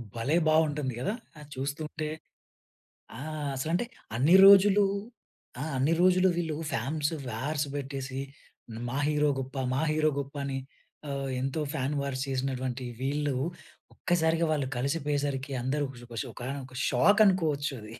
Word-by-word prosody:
భలే 125 Hz, +8 st, 0 dB
బావుంటుంది 150 Hz, -4 st, +2 dB
గదా! 135 Hz, -, -1 dB, 0.3 s
అది 150 Hz, -1 st, -12 dB
చూస్తుంటే. 150 Hz, +3 st, -4 dB, 1.1 s
ఆ! -, -, -6 dB, 0.4 s
అసలంటే 165 Hz, -, 0 dB, 0.3 s
అన్ని 145 Hz, +10 st, +5 dB
రోజులు 200 Hz, +1 st, +8 dB, 0.8 s
ఆహ్, 155 Hz, +2 st, -3 dB
అన్ని 140 Hz, +5 st, +2 dB
రోజులు 185 Hz, +1 st, +5 dB
వీళ్ళు 160 Hz, -3 st, -1 dB, 0.2 s
ఫామ్సు 150 Hz, +7 st, -1 dB
వార్స్ 145 Hz, +6 st, -2 dB
బెట్టేసి 135 Hz, -1 st, -4 dB, 0.7 s
మా 135 Hz, -, -3 dB
హీరో 150 Hz, -1 st, +2 dB
గొప్ప, 135 Hz, +1 st, -6 dB, 0.2 s
మా 135 Hz, -, +1 dB
హీరో 155 Hz, 0 st, +3 dB
గొప్ప 140 Hz, +1 st, -6 dB
అని 135 Hz, -1 st, -2 dB, 0.5 s
ఆహ్, 140 Hz, -1 st, -3 dB
ఎంతో 135 Hz, +4 st, -1 dB
ఫాన్ 140 Hz, 0 st, -1 dB
వార్స్ 135 Hz, -1 st, -2 dB
చేసినటువంటి 130 Hz, -1 st, -2 dB, 0.2 s
వీళ్ళు 145 Hz, 0 st, 0 dB, 0.6 s
ఒక్కసారిగా 165 Hz, -2 st, +1 dB
వాళ్ళు 145 Hz, -4 st, 0 dB
కలిసిపోయేసరికి 140 Hz, 0 st, -1 dB
అందరూ 140 Hz, +4 st, 0 dB
గొష 120 Hz, -1 st, -12 dB
గొష 115 Hz, -2 st, -3 dB
ఒకానొక 130 Hz, 0 st, -6 dB
షాకనుకోవచ్చు 160 Hz, -, +3 dB
అది. 110 Hz, +1 st, -10 dB
145 Hz, 125 wpm, -29 LUFS, 130-155 Hz, 1.1 s, రోజులు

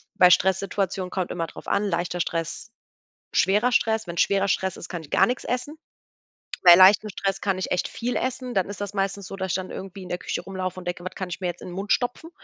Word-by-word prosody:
bei 180 Hz, -, +7 dB
Stresssituationen 190 Hz, 0 st, +1 dB
kommt 185 Hz, -2 st, -3 dB
immer 165 Hz, -1 st, -2 dB
drauf -, -, -12 dB
an, 205 Hz, -, +1 dB
leichter 175 Hz, -1 st, -2 dB
Stress, 165 Hz, +6 st, -3 dB, 0.6 s
schwerer 210 Hz, +6 st, +3 dB
Stress. 220 Hz, -3 st, +1 dB
Wenn 170 Hz, -, -6 dB
schwerer 200 Hz, +3 st, +2 dB
Stress 190 Hz, -1 st, 0 dB
ist, -, -, -8 dB
kann 175 Hz, -3 st, -5 dB
ich 145 Hz, -, -14 dB
gar -, -, +5 dB
nix 245 Hz, +1 st, -2 dB
essen. 255 Hz, +5 st, -3 dB, 0.9 s
Bei 175 Hz, -1 st, +10 dB
leichtem 190 Hz, +3 st, +7 dB
Stress 195 Hz, 0 st, -2 dB
kann 195 Hz, -2 st, 0 dB
ich -, -, -4 dB
echt 180 Hz, -, +1 dB
viel 245 Hz, +1 st, -3 dB
essen. 255 Hz, -1 st, -2 dB
Dann 190 Hz, 0 st, +1 dB
ist 205 Hz, 0 st, -7 dB
das 205 Hz, 0 st, -4 dB
meistens 195 Hz, 0 st, -2 dB
so, 195 Hz, -, -7 dB
dass 190 Hz, -2 st, -3 dB
ich -, -, 0 dB
dann 185 Hz, -1 st, -3 dB
irgendwie 195 Hz, 0 st, -8 dB
in -, -, -10 dB
der 180 Hz, -, -2 dB
Küche -, -, -4 dB
rumlaufen 185 Hz, -1 st, -5 dB
und -, -, -13 dB
denke: 175 Hz, 0 st, -4 dB
„Wat -, -, -6 dB
kann 185 Hz, -2 st, -5 dB
ich 175 Hz, -, -5 dB
mir 185 Hz, -, -2 dB
jetzt 175 Hz, 0 st, -5 dB
in -, -, -8 dB
'nen 175 Hz, -, -8 dB
Mund 200 Hz, +3 st, -4 dB
stopfen?“ 245 Hz, +6 st, -2 dB
190 Hz, 245 wpm, -25 LUFS, 180-205 Hz, 0.9 s, Bei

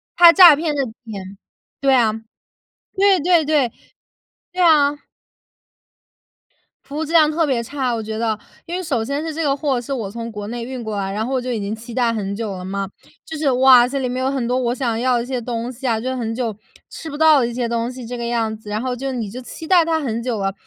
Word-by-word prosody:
它 345 Hz, -1 st, +9 dB
诈 350 Hz, -4 st, +9 dB
骗 310 Hz, +1 st, -2 dB
的 280 Hz, -, +1 dB
钱 205 Hz, -4 st, -9 dB, 0.4 s
对 275 Hz, -1 st, +3 dB
啊， 230 Hz, -4 st, +3 dB, 0.8 s
对 390 Hz, -1 st, +4 dB
对 345 Hz, -1 st, +3 dB
对， 285 Hz, -6 st, +2 dB, 0.8 s
对 365 Hz, -, -1 dB
啊。 295 Hz, -3 st, +4 dB, 1.9 s
服 285 Hz, +2 st, -8 dB
务 320 Hz, -, -1 dB
质 315 Hz, -, -7 dB
量 315 Hz, -3 st, +5 dB
特 325 Hz, +1 st, +1 dB
别 260 Hz, -5 st, 0 dB
差。 255 Hz, 0 st, -2 dB
我 230 Hz, -, -2 dB
觉 220 Hz, 0 st, -5 dB
得， 220 Hz, -1 st, -1 dB, 0.3 s
因 345 Hz, -, -5 dB
为 370 Hz, -, -2 dB
首 275 Hz, -10 st, -1 dB
先 280 Hz, +6 st, -3 dB
是 320 Hz, -1 st, -4 dB
这 325 Hz, -, -2 dB
个 280 Hz, -2 st, +1 dB
货 275 Hz, -3 st, -1 dB
是 245 Hz, +3 st, -5 dB
我 225 Hz, -7 st, -3 dB
从 230 Hz, +2 st, -6 dB
国 210 Hz, -1 st, -6 dB
内 235 Hz, +1 st, -5 dB
运 250 Hz, -1 st, -6 dB
过 215 Hz, -2 st, -4 dB
来， 195 Hz, -1 st, -2 dB
然 215 Hz, +2 st, -2 dB
后 265 Hz, -, -3 dB
我 255 Hz, -, 0 dB
就 255 Hz, -, -4 dB
已 230 Hz, -, -2 dB
经 205 Hz, +1 st, -3 dB
期 230 Hz, +2 st, -11 dB
待 235 Hz, -1 st, +1 dB
很 200 Hz, -2 st, -3 dB
久 215 Hz, -3 st, -4 dB
了 180 Hz, -, -7 dB
嘛。 195 Hz, 0 st, -3 dB, 0.4 s
就 320 Hz, -, -6 dB
是， 295 Hz, -3 st, +1 dB
哇， 255 Hz, -1 st, +6 dB
这 275 Hz, +2 st, -3 dB
里 255 Hz, -, -1 dB
面 255 Hz, +1 st, -2 dB
有 265 Hz, -, +1 dB
很 260 Hz, -4 st, -2 dB
多 250 Hz, -, 0 dB
我 245 Hz, -2 st, 0 dB
想 235 Hz, -4 st, -1 dB
要 250 Hz, 0 st, +2 dB
的 235 Hz, -, -1 dB
一 -, -, -7 dB
些 255 Hz, 0 st, -3 dB
东 235 Hz, +1 st, -4 dB
西 260 Hz, +2 st, -6 dB
啊， 225 Hz, -2 st, +1 dB
就 260 Hz, +2 st, -3 dB
很 225 Hz, -2 st, -3 dB
久 230 Hz, -4 st, -3 dB, 0.3 s
吃 320 Hz, -, -8 dB
不 290 Hz, -, -6 dB
到 315 Hz, -2 st, +6 dB
的 240 Hz, -, +1 dB
一 240 Hz, -, -5 dB
些 240 Hz, 0 st, -2 dB
东 235 Hz, +1 st, -2 dB
西 250 Hz, -2 st, -9 dB
这 245 Hz, +1 st, -6 dB
个 235 Hz, -, -4 dB
样 230 Hz, -2 st, -1 dB
子。 215 Hz, -1 st, -13 dB
然 215 Hz, +1 st, -2 dB
后 255 Hz, 0 st, -2 dB
就 270 Hz, +2 st, -4 dB
你 230 Hz, -5 st, -4 dB
就 250 Hz, +5 st, -8 dB
期 320 Hz, +5 st, -9 dB
待 355 Hz, -2 st, +5 dB
它 325 Hz, -1 st, +1 dB
很 235 Hz, -6 st, -3 dB
久 240 Hz, -3 st, -2 dB
了， 195 Hz, 0 st, -1 dB
250 Hz, 275 characters per minute, -20 LUFS, 225-285 Hz, 1.9 s, 它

